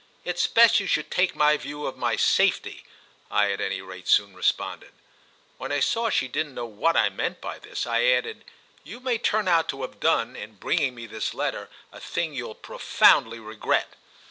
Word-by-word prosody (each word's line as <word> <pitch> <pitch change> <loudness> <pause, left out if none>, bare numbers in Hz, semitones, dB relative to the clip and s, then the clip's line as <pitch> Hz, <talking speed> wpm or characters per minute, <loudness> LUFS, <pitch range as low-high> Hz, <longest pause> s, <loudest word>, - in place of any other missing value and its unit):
"It's 175 -1 0
best 230 -2 +6
you 200 - -4
should 155 - 0
take 180 0 +1
my 150 0 +4
view 145 0 -7
of 135 - -4
my - - 0
safety," - - +1 0.5
I 100 -1 +2
at 100 - -3
any 95 0 -3
rate 95 -1 -11
soon 100 -1 +3
responded. 90 - -2 0.7
When - - -5
I 145 - +1
saw 230 - +1
she 130 - +1
didn't 145 +1 -3
know 120 - -4
what 115 +10 0
I - - +4
meant - - -3
by - - -7
this - - -5
I - - +1
added: 475 -3 +1 0.4
"You 240 - -10
may 250 -3 -1
turn 215 -3 0
out 165 -2 +3
to 135 -1 -4
have 105 -5 -7
done, 115 +3 +1
in 105 +1 -9
bringing 130 - 0
me 120 -1 -8
this 110 -1 -4
letter, - - -3 0.2
a - - -12
thing 165 -2 -3
you'll 120 -5 -6
profoundly 115 +1 +3
regret." 110 -1 -2
135 Hz, 195 wpm, -25 LUFS, 110-180 Hz, 0.7 s, best